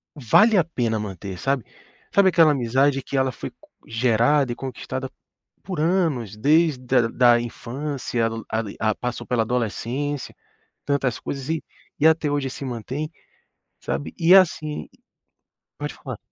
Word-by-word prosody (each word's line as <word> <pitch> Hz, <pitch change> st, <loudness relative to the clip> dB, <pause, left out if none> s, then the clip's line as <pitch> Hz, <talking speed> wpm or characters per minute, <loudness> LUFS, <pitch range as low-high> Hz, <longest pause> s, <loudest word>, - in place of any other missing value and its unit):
vale 200 Hz, -, +4 dB
a 180 Hz, -, +5 dB
pena 120 Hz, -9 st, -1 dB
manter, 95 Hz, -2 st, -6 dB
sabe. 135 Hz, +1 st, 0 dB, 0.5 s
Sabe 200 Hz, -1 st, +6 dB
aquela 165 Hz, -3 st, +5 dB
amizade 135 Hz, +1 st, +2 dB
que 140 Hz, -, -3 dB
ela 130 Hz, -1 st, +2 dB
foi -, -, -7 dB
co -, -, -22 dB, 0.2 s
gerada 120 Hz, +4 st, +2 dB
e 120 Hz, -, -3 dB
conquistada 130 Hz, 0 st, -5 dB, 0.5 s
por 180 Hz, -4 st, -4 dB
anos, 155 Hz, -, 0 dB
desde 150 Hz, +3 st, +3 dB
da 125 Hz, -2 st, +3 dB
da 120 Hz, 0 st, +4 dB
infância, 120 Hz, 0 st, -3 dB, 0.2 s
a 110 Hz, -1 st, -1 dB
a -, -, 0 dB
passou 125 Hz, -1 st, -5 dB
pela 120 Hz, -3 st, +1 dB
adolescência, 125 Hz, +5 st, -2 dB, 0.5 s
tantas 135 Hz, -4 st, 0 dB
coisas 135 Hz, -1 st, -5 dB
e 160 Hz, -1 st, -1 dB, 0.4 s
e 155 Hz, -, +6 dB
até 160 Hz, -2 st, +3 dB
hoje 140 Hz, -2 st, -1 dB
se 135 Hz, -, -7 dB
mantém, 130 Hz, +5 st, -4 dB, 0.7 s
sabe, 145 Hz, -, -4 dB
e, 170 Hz, +1 st, +5 dB
assim 155 Hz, -5 st, +3 dB, 0.9 s
pode -, -, -4 dB
falar. -, -, -8 dB
130 Hz, 145 wpm, -23 LUFS, 120-150 Hz, 0.9 s, Sabe